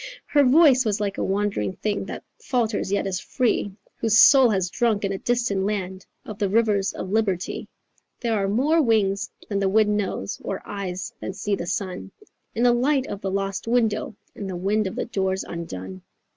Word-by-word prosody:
Her 290 -1 +3
voice 270 -1 +6
was 210 -2 0
like 200 -1 -2
a - - 0
wandering 195 - -1
thing 210 -1 -2
That - - -7 0.2
falters 230 - -1
yet 200 - 0
is 185 -2 -2
free, 240 -5 0 0.3
Whose 225 -1 +2
soul 265 0 +8
has 190 -4 0
drunk 220 -4 +1
in 195 - -1
a 195 - -4
distant 235 -5 0
land 190 -2 -3 0.2
Of 210 -2 -8
the 200 - +1
rivers 210 -2 +2
of 185 - -6
liberty. 200 -5 -1 0.5
"There 235 -2 -1
are 200 -2 +1
more 290 +10 +3
wings 210 -6 +1 0.2
than 200 -2 -1
the 195 -1 +1
wind 210 +1 +3
knows 190 - -3
Or 195 - -3
eyes 190 -3 -5
than 190 - -5
see 205 +1 -3
the 170 - -6
sun 180 - -3 0.5
In 230 - 0
the 245 -1 +5
light 265 +2 +2
of 200 -5 -6
the 195 - -2
lost 195 +1 -3
window 225 -3 +1 0.2
And 200 - -6
the 185 - -4
wind 200 +4 0
of 190 - -6
the - - -2
doors 190 -3 -1
undone. 95 - -7
205 Hz, 195 wpm, -24 LUFS, 190-230 Hz, 0.5 s, soul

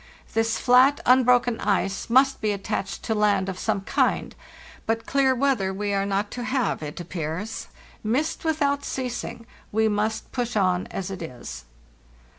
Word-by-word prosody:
This 225 0 +1
flat, 260 +3 +5
unbroken 250 -2 +4
ice 195 0 0
must 265 +3 +4
be 215 -1 +1
attached 200 -1 -3
to 220 - 0
land 205 -3 +2
of 185 -1 -4
some 195 - 0
kind; - - 0 0.5
but 225 0 0
clear 270 -1 +3
weather 250 -8 +1
we 205 +1 -2
are 195 0 0
not 200 +1 -1
to 245 - -5
have, 255 - 0
it 150 +1 -6
appears. 175 +4 -4 0.4
Mist 270 +9 -1
without 285 -3 +1
ceasing; 245 -2 -4 0.3
we 220 +1 +2
must 215 +1 -1
push 245 -2 -2
on 185 -3 +2
as 195 0 -5
it 190 - -5
1s." 120 - -8
220 Hz, 155 wpm, -25 LUFS, 195-250 Hz, 0.5 s, flat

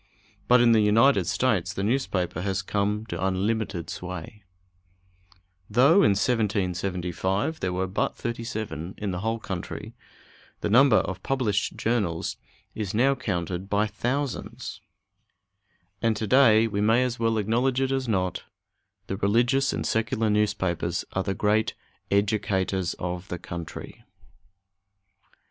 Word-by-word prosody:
But 125 0 +6
in 120 -1 +5
the 115 - +5
United 115 +7 +4
States 105 -8 +1
the 95 - -3
newspaper 100 -8 -1
has 95 0 -1
come 105 +2 -1
to 85 -4 -5
unlimited 95 -2 -1
sway. 90 +4 -7 1.3
Though 130 - +5
in 100 - +4
1775 95 - -1
there 90 - -1
were 90 +1 -1
but 95 +1 -1
thirty 115 0 -4
seven 100 - -5
in 105 -2 -3
the 90 - -3
whole 115 +3 -1
country, 95 -5 -6 0.7
the 105 - -1
number 130 +1 +6
of 95 -3 0
published 110 -6 0
journals 105 -8 -1 0.4
is 105 -2 -4
now 135 +5 +4
counted 95 -7 -3
by 105 +1 +2
thousands; 125 +6 -3 1.2
and 115 -2 +1
to 110 - -2
day 115 -1 +5
we 100 -2 -1
may 115 +4 +4
as 125 -2 -2
well 115 -1 +1
acknowledge 120 +5 +1
it 135 0 0
as 135 -1 -1
not 95 -5 -1 0.6
the 95 - -4
religious 120 +7 +2
and - - -3
secular 110 0 0
newspapers 95 -5 0
are 95 - 0
the 95 0 -2
great 105 +3 +1 0.3
educators 100 -3 0
of 90 +1 -5
the 90 - -4
country. 85 -1 -8
105 Hz, 135 wpm, -26 LUFS, 95-115 Hz, 1.3 s, But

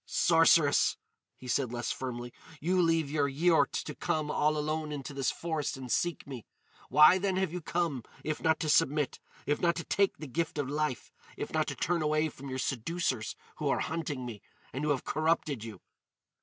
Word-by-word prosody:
"Sorceress," 165 -3 +4 0.4
he 130 - -11
said 125 0 0
less 120 -1 -2
firmly, 120 -2 -5 0.3
"you 180 +5 +2
leave 165 -4 +2
your 145 -2 +1
Yiort 165 +5 +3
to - - -6
come 155 -1 -1
all 150 +1 +2
alone 155 +1 -2
into 145 0 -5
this 135 -2 0
forest 160 -5 -3
and 130 -2 -7
seek 175 -3 0
me. 130 -5 -7 0.5
Why 150 +7 +7
then 190 0 0
have 185 -3 0
you 180 - -4
come, 165 -5 -1 0.2
if 155 -1 -3
not 160 -1 +2
to 160 - -1
submit!—if 145 0 0
not 170 -1 +3
to 165 - -4
take 200 +3 +1
the 155 - -7
gift 160 +4 -2
of 145 -2 -1
life—if 150 -3 -4
not - - +1
to - - -3
turn 175 -1 0
away 155 +1 +1
from 140 -1 -10
your 130 - -3
seducers 130 -1 -2 0.2
who - - -1
are - - +1
hunting 150 -5 -3
me, 115 -4 -7 0.3
and 135 - -3
who 150 - 0
have 140 -3 +1
corrupted 155 -6 0
you?" 110 -5 -9
150 Hz, 185 wpm, -30 LUFS, 135-165 Hz, 0.5 s, Why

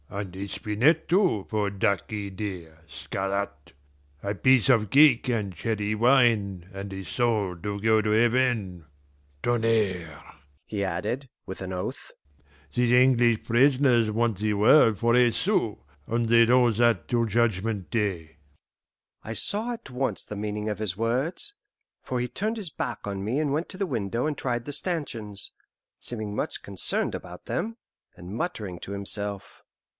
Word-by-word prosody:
"And 100 -2 -6
a 100 +1 -5
spinet, 110 - +1
too, 175 - +2
for 105 -2 0
ducky 100 +1 -1
dear, 90 -5 -6
Scarrat; 95 0 -4 0.5
a 100 0 -2
piece 130 +5 +4
of 115 -6 +3
cake 135 -1 +5
and 105 -6 -1
cherry 105 -2 -1
wine, 110 -7 +3
and 100 0 -6
a 95 0 -6
soul 110 -7 0
to 100 +1 -3
go 110 +1 +3
to 105 - -1
heaven! 110 - +1 0.5
Tonnerre!" 105 -9 0 0.4
he 100 -2 -3
added, 105 +9 -3 0.2
with 95 - -7
an 95 0 -5
oath, 90 0 -5 0.6
"these 120 -1 +2
English 120 -2 +4
prisoners 125 -2 +3
want 115 -2 0
the 105 0 0
world 110 +1 +5
for 115 +3 +2
a 125 -1 +5
sou, - - 0 0.3
and 115 +1 0
they'd 115 +1 +5
owe 125 -1 +5
that 120 +1 +2
till 120 -1 +1
judgment 110 -3 0
day." 90 -9 -2 0.9
I 110 - -6
saw 215 - -1
at 230 - -10
once 130 +1 -2
the 105 - -7
meaning 105 +1 -3
of 105 -1 -3
his 100 -4 -2
words, 130 - -1 0.5
for 125 - -3
he 125 - -1
turned 215 - -2
his 195 -7 -6
back - - -4
on 100 -1 -4
me 120 +8 -1
and 145 -3 0
went 160 +4 -2
to 185 - -8
the 195 0 -1
window 115 - -2
and 155 -1 -1
tried 120 -2 -2
the 145 - -4
stanchions, 125 - -4 0.5
seeming 110 -3 -2
much - - -3
concerned 100 -2 0
about - - -9
them, 225 +6 -3 0.4
and 90 +2 -8
muttering 110 - -4
to 95 - -8
himself. 100 0 -4
110 Hz, 155 wpm, -26 LUFS, 100-125 Hz, 0.9 s, cake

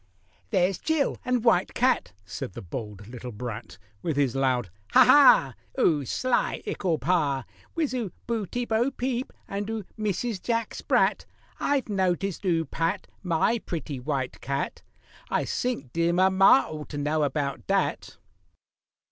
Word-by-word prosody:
"There's 190 -3 +2
Jill 315 -3 0
and 250 -2 0
White 200 -6 +3
Cat" 255 - +2
(said 100 - -6
the - - -7
bold 105 +1 -7
little 125 +1 -7
brat, 110 -4 -7 0.2
With 155 +1 -2
his 135 -4 +2
loud, 130 -7 +1 0.2
"Ha, - - +8
ha!") 290 -1 +7 0.3
"'Oo 150 - +3
sly 255 - 0
ickle 175 -5 -1
Pa! 145 -8 +1 0.3
Wiz 315 -5 0
'oo 235 -7 -2
Beauty, 235 +1 -2
Bo 230 +3 +1
Peep, 255 -1 -3 0.2
and 200 +1 -4
'oo 225 -2 -3 0.2
Mrs. 215 0 -2
Jack 230 -2 -1
Sprat! - - +1 0.3
I've 285 -2 +1
noticed 190 -1 -1
'oo 165 -3 +2
pat 165 +6 -2 0.2
My 180 +6 +1
pretty 150 -8 -5
White 130 -1 -3
Cat— 140 +1 -3 0.5
I - - 0
sink 195 - -3
dear 170 +1 +2
mamma 190 -5 +5
ought 150 -1 -7
to 145 - -5
know 150 +2 0
about 140 -1 -2
dat!" 195 0 -1
180 Hz, 145 wpm, -26 LUFS, 140-225 Hz, 0.5 s, Ha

